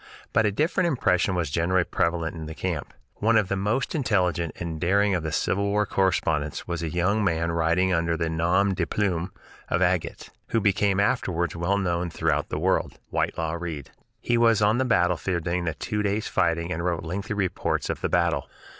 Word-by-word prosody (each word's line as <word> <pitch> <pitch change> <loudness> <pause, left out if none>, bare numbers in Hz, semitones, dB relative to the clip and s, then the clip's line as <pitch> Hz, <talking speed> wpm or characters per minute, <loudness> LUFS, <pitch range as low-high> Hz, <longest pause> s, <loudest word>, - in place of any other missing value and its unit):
But 110 0 +4
a - - +1
different 155 - +1
impression 95 - +1
was 85 -5 -1
generally 85 +3 +2
prevalent 85 -1 -1
in 80 -2 -6
the 80 - -7
camp. 85 -5 -3 0.3
One 110 +2 +3
of 105 -4 +1
the 100 - 0
most 105 +7 -1
intelligent 90 - 0
and 80 -2 -5
daring 100 +3 +3
of 90 - 0
the 80 -1 -3
Civil 100 +6 0
War 105 +1 +1
correspondents 80 -7 0
was 85 -1 -3
a 80 - -2
young 90 +6 +1
man 85 -3 0
writing 85 +3 +2
under 85 -1 +1
the 85 - -1
nom 85 +5 +2
de 85 -3 -1
plume 90 -3 -1 0.4
of 90 +2 +2
"Agate," 90 -2 -1 0.2
who 115 - +1
became 100 -1 +2
afterwards 85 -5 0
well 85 +4 0
known 90 -3 -1
throughout - - -1
the - - -2
world, - - 0
Whitelaw 80 +1 -1
Reid. 80 -6 -6 0.3
He 120 0 +1
was 115 -2 +4
on 105 +3 +3
the 130 - +2
battlefield 90 -5 +1
during 85 +1 -1
the 80 -3 -2
two 105 +6 -2
days' 105 +1 -1
fighting 85 +1 0
and 85 -1 -2
wrote 85 -2 -1
lengthy 95 +5 -4
reports 100 -3 -1
of - - -3
the - - -1
battle. - - +1
90 Hz, 195 wpm, -25 LUFS, 85-100 Hz, 0.4 s, But